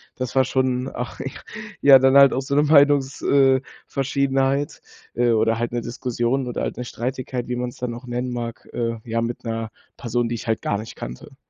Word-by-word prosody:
Das 130 -2 -4
war 130 0 +4
schon, 130 0 0
ach, 120 0 -6
ja, - - -4 0.5
ja, 135 -2 +8
dann 130 +1 +4
halt 140 -1 +8
auch 130 - 0
so 140 +1 -2
'ne 145 - +4
Meinungs 145 -2 +4
äh, 135 -1 +4 0.3
Verschiedenheit, 135 +1 0 0.3
äh, 120 0 +2
oder 115 0 +2
halt 120 0 -2
'ne 120 - -1
Diskussion 125 +2 -2
oder 120 - -3
halt - - -3
'ne 125 - -4
Streitigkeit, 125 0 -4
wie 125 - -2
man's 125 0 -4
dann 125 -1 -3
auch 125 +2 -11
nennen 125 +1 -3
mag, 120 -1 -5
äh, 115 -1 -2
ja 115 0 -1
mit 115 +1 -4
'ner 115 -1 -3 0.3
Person, 120 0 -1
die 120 - -2
ich 115 - -8
halt 110 -1 0
gar 105 - -1
nicht 110 +1 -9
kannte. - - -9
125 Hz, 210 wpm, -22 LUFS, 120-135 Hz, 0.5 s, ja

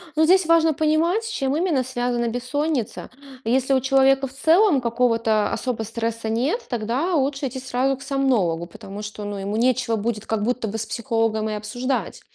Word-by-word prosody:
Ну, 315 - +3
здесь 370 +2 +5
важно 325 -1 +4
понимать, 315 +8 +1
с 450 - -5
чем 270 -9 -1
именно 325 -7 +1
связана 245 -1 -1
бессонница. 250 +1 -2 0.3
Если 260 +4 +1
у 265 - +4
человека 270 +1 +3
в 255 - -14
целом 320 +2 +4
какого-то 230 -3 +1
особо 245 -3 -2
стресса 230 0 -3
нет, 265 - -1
тогда 245 - -1
лучше 275 -1 0
идти 260 +1 -6
сразу 260 +1 0
к - - -17
сомнологу, 250 - 0
потому 195 +4 -9
что, 210 0 -7
ну, 205 0 -4
ему 200 +2 -3
нечего 250 -1 +1
будет 220 0 -3
как 220 -2 -1
будто 245 0 -1
бы 215 +2 -4
с 220 - -3
психологом 225 -3 -1
и 215 - -3
обсуждать. 245 +5 -3
250 Hz, 180 wpm, -23 LUFS, 225-275 Hz, 0.3 s, здесь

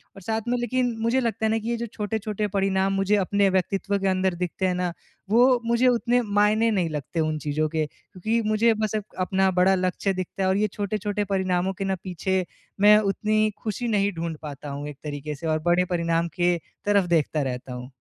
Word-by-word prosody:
और 195 - -11
साथ 220 +4 -2
में 245 +1 +1
लेकिन 245 0 0
मुझे 230 +3 +2
लगता 225 -3 -1
है - - +2
ना 225 - +2
कि 225 +1 -5
ये 235 - 0
जो 235 - -3
छोटे-छोटे 210 0 -2
परिणाम 195 0 +1
मुझे 195 +1 +2
अपने 200 +1 +2
व्यक्तित्व 195 +2 0
के 195 - 0
अंदर 185 -1 +1
दिखते 180 +2 -1
हैं 180 - 0
ना? 180 -1 -1 0.4
वो 245 +3 +5
मुझे 235 +2 +3
उतने 245 0 +2 0.2
मायने 215 +2 +4
नहीं 185 -6 +1
लगते 150 +2 -4
उन 155 -1 0
चीज़ों 155 +1 0
के 155 0 0
क्योंकि 215 +9 -3
मुझे 225 +2 +4
बस 215 0 -1
अप 215 - -1 0.2
अपना 190 0 +2
बड़ा 190 +1 +5
लक्ष्य 185 +1 0
दिखता 185 +1 -4
है। 190 - +2
और 190 - +2
ये 215 +1 +2
छोटे-छोटे 205 0 -2
परिणामों 185 0 0
के 195 - -1
ना 190 0 0
पीछे 185 0 -1 0.4
मैं 210 +1 +8
उतनी 215 +1 +1
ख़ुशी 225 +3 -2
नहीं 205 -2 +2
ढूँढ 165 -1 -3
पाता 145 -1 -7
हूँ, 140 +1 -5
एक 145 - -10
तरीक़े 150 0 -5
से 165 +3 -6
और 155 0 +1
बड़े 180 +1 +3
परिणाम 170 -1 0
के 175 0 +2 0.3
तरफ़ 200 -3 +3
देखता 155 0 -1
रहता 130 -1 -4
हूँ। 125 +1 -8
195 Hz, 215 wpm, -25 LUFS, 175-215 Hz, 0.4 s, मैं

